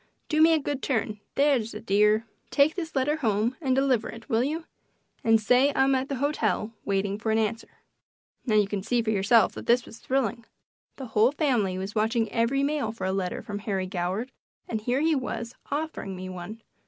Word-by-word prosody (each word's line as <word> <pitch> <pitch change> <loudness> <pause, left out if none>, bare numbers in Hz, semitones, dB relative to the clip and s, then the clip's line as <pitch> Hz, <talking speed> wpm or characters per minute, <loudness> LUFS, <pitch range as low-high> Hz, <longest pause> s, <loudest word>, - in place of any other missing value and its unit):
Do 310 0 +2
me 325 +1 +7
a - - +2
good 285 -1 -3
turn 220 -5 -1 0.2
that's 270 -7 +2
a - - -5
dear. 210 +3 +3 0.2
Take 290 +2 +4
this 330 -5 -5
letter 285 +3 +1
home 225 -2 0
and 260 -4 +1
deliver 265 -4 +2
it. 230 0 -10
Will 230 -2 +2
you? 315 +4 -2 0.6
And 225 -1 +5
say 250 +6 +4
I'm 270 0 +4
at 265 +1 0
the 280 - -1
hotel 265 -5 -1
waiting 200 0 -1
for 220 - -3
an 220 - +2
answer." 225 +1 -3 0.6
Now, 220 -5 0
you 210 -2 +4
can 200 -1 -3
see 240 +4 +1
yourself 220 +2 +4
that - - -9
this 240 0 +4
was 225 - -12
thrilling. 240 -3 -1 0.5
The 265 - -7
whole 220 +4 +5
family 245 - +1
was 190 +2 -5
watching 225 +1 +1
every 245 +4 +1
mail 285 -6 0
for 225 -4 -6
a 190 - 0
letter 190 -2 -2
from 205 0 -5
Harry 195 -3 -2
Goward 185 +7 -3 0.4
and 220 -2 -3
here 245 +5 0
he 320 +1 +3
was 240 -3 -3 0.2
offering 290 -10 -3
me 185 0 -6
one! 185 +5 -8
230 Hz, 200 wpm, -27 LUFS, 210-270 Hz, 0.6 s, me